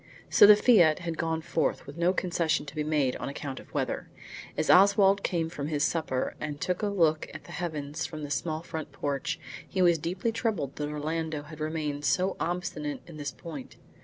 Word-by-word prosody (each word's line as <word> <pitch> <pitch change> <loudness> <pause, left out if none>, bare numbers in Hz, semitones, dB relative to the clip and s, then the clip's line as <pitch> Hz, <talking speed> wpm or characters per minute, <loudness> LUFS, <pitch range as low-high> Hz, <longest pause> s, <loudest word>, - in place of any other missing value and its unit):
So 205 - +8
the 210 - +10
fiat 195 -9 +5
had 170 -2 -5
gone 165 0 0
forth, 165 -2 -1
with 140 - -9
no 170 +2 +3
concession 170 -4 0
to 145 - -9
be 155 -1 -2
made 150 -4 +1
on - - -4
account 140 -1 -5
of - - -15
weather. - - -2 0.5
As - - 0
Oswald 200 +1 +6
came 170 -4 0
from 150 -4 -5
his 150 -2 0
supper 155 -5 0
and 150 -1 -4
took 180 +4 -1
a 210 - +1
look 165 -6 +2
at - - -8
the - - -12
heavens 155 -2 -3
from 155 -2 -7
the 145 - -5
small 155 +4 -2
front 160 -3 -6
porch, 150 +4 -2 0.3
he 190 - -3
was 170 -2 +4
deeply 180 +8 -1
troubled 215 - -2
that 150 0 -2
Orlando 155 0 -3
had 155 +1 -11
remained 155 -2 -2
so 185 +5 +2
obstinate 165 -4 -3
on 165 -3 -10
this 145 -1 -3
point. 150 -6 -9
160 Hz, 200 wpm, -28 LUFS, 150-175 Hz, 0.5 s, the